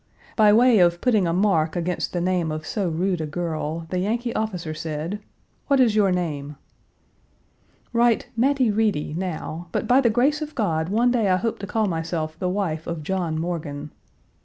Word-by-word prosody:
By 215 -2 +6
way 235 0 +5
of 175 -1 +4
putting 215 -6 +2
a - - +1
mark 165 -4 +2
against 175 +1 -2
the 175 - -2
name 175 -3 0
of 155 0 -5
so 195 -1 -1
rude 175 +1 -1
a 155 - -3
girl, 160 0 -3
the 180 - 0
Yankee 230 +5 -1
officer 180 -7 -3
said, 160 +5 -4 0.5
"What 275 -2 +3
is 235 -5 +4
your 200 -3 +4
name?" 150 -5 -3 1.4
"Write 235 -1 +3
'Mattie 255 -1 +2
Reedy' 205 -9 0
now, 175 -1 -4
but - - -1
by 255 +2 +5
the 240 - +3
grace 270 +7 +2
of 305 0 -6
God 165 -8 0
one 235 +5 +3
day 225 -5 +2
I 185 - +4
hope 225 +4 -2
to 200 - -6
call 220 +1 0
myself 160 -3 -2
the 180 - -1
wife 180 -5 -2
of 165 -2 -4
John 170 -2 -2
Morgan." 155 -4 -4
180 Hz, 185 wpm, -23 LUFS, 160-220 Hz, 1.4 s, By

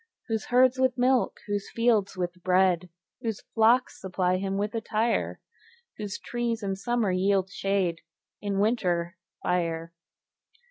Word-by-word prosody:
Whose 220 -1 -1
herds 255 +1 +4
with 260 -1 +2
milk, 250 0 +2
whose 205 -1 -3
fields 230 -5 +1
with 180 0 -3
bread, 180 -1 +3 0.3
Whose 225 -3 -3
flocks 235 +3 +3
supply 185 -1 0
him 195 +1 -2
with 205 +2 -1
attire; 225 0 0 0.6
Whose 205 -1 -4
trees 235 -2 -3
in 195 -1 -1
summer 230 0 0
yield 190 +1 +1
shade, 195 -4 0 0.4
In 200 -1 -2
winter, 180 -5 +1 0.3
fire. 170 -2 -1
200 Hz, 130 wpm, -27 LUFS, 185-230 Hz, 0.6 s, herds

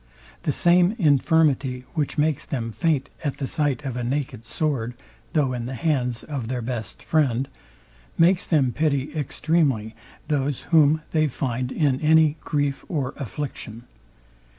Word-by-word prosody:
The - - 0
same 175 +4 +4
infirmity, 145 - +2
which 150 -4 -2
makes 150 -1 +1
them 115 -4 -3
faint 140 +4 0
at 145 -3 -2
the 140 - -2
sight 140 -2 -1
of 130 -3 -3
a 125 - -3
naked 125 -3 -3
sword, 125 -5 -1 0.4
though 145 -6 +2
in 120 -1 -4
the 130 - -5
hands 125 -5 0
of 135 -6 -4
their 125 -1 -3
best 115 -4 -5
friend, 135 -5 +1 0.7
makes 175 +2 +4
them 140 -7 +3
pity 150 0 0
extremely 145 -6 0 0.3
those, 145 -2 0
whom 155 -1 +4
they 155 -1 +3
find 125 -2 -2
in 140 -4 +1
any 155 0 +4
grief 145 -2 -1
or 140 -8 -2
affliction. 120 -3 -6
140 Hz, 145 wpm, -24 LUFS, 125-155 Hz, 0.7 s, same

